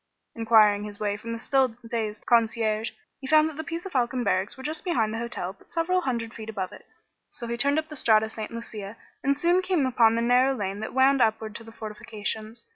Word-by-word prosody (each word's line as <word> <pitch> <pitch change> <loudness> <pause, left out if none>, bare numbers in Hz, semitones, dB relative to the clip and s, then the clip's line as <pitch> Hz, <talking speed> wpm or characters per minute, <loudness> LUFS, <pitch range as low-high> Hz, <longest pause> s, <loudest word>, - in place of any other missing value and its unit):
Enquiring 220 -3 +5
his 210 0 -8
way 205 -1 0
from 230 +2 -7
the 230 - -3
still 260 0 +1
dazed 220 -2 -3
concierge, 225 -1 +2 0.3
he 265 - -7
found 310 +2 +5
that 315 - -6
the 315 - -4
Pizzofalcone 270 -8 -2
barracks 195 0 0
were 265 - -9
just 310 +2 -3
behind 225 - 0
the 225 - -3
hotel 230 -6 -3
but 195 - -23
several 365 +2 +1
hundred 235 -7 -2
feet 220 -1 -8
above 190 -4 -3
it; - - -14 0.4
so 235 - -7
he 235 0 -2
turned 280 +4 +3
up 315 0 -1
the 305 - -9
Strada 220 -5 +4
St. 220 -1 -6
Lucia 220 -2 -7 0.3
and 275 +1 +2
soon 345 +4 +3
came 365 -6 +1
upon 235 -3 +4
the 230 - 0
narrow 250 +3 +4
lane 200 -3 -3
that 220 +3 -6
wound 265 0 +5
upward 220 -1 +1
to 230 - -8
the 225 - -12
fortifications. 215 - -5
230 Hz, 215 wpm, -26 LUFS, 215-270 Hz, 0.4 s, Enquiring